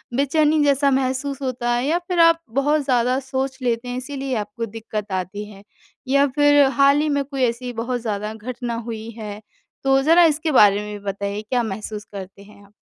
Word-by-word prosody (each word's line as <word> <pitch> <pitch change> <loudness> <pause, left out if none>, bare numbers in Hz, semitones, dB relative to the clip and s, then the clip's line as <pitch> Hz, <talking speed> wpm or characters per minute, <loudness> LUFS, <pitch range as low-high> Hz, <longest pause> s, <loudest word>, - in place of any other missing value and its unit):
बेचैनी 300 +3 +2
जैसा 280 0 +3
महसूस 265 +1 -1
होता 250 -2 -2
है 240 +2 0
या 320 +4 +2
फिर 360 -2 -1
आप 330 0 +5 0.2
बहुत 295 +2 +2
ज़्यादा 250 0 +2
सोच 265 0 -3
लेते 240 -1 -1
हैं, 245 0 -4
इसीलिए 270 0 -4
आपको 230 +2 -4
दिक्कत 215 -1 -6
आती 190 +3 -3
है? 200 -1 -14 0.4
या 280 +2 +4
फिर 290 -1 +5
हाल 280 0 +5
ही 305 - 0
में 285 -1 +1
कोई 275 -1 -3
ऐसी 245 +1 -1
बहुत 240 +2 -3
ज़्यादा 210 -1 -3
घटना 240 +2 -5
हुई 225 -1 -6
है? 210 -1 -7 0.4
तो 270 0 +3
ज़रा 330 +5 +5
इसके 315 0 +1
बारे 205 -6 +5
में 210 - -7
भी 200 - -19
बताइए, 200 +1 -3
क्या 240 +3 -1
महसूस 210 0 -6
करते 195 0 -9
हैं 205 0 -17
आप? 200 - -24
250 Hz, 195 wpm, -21 LUFS, 215-280 Hz, 0.4 s, आप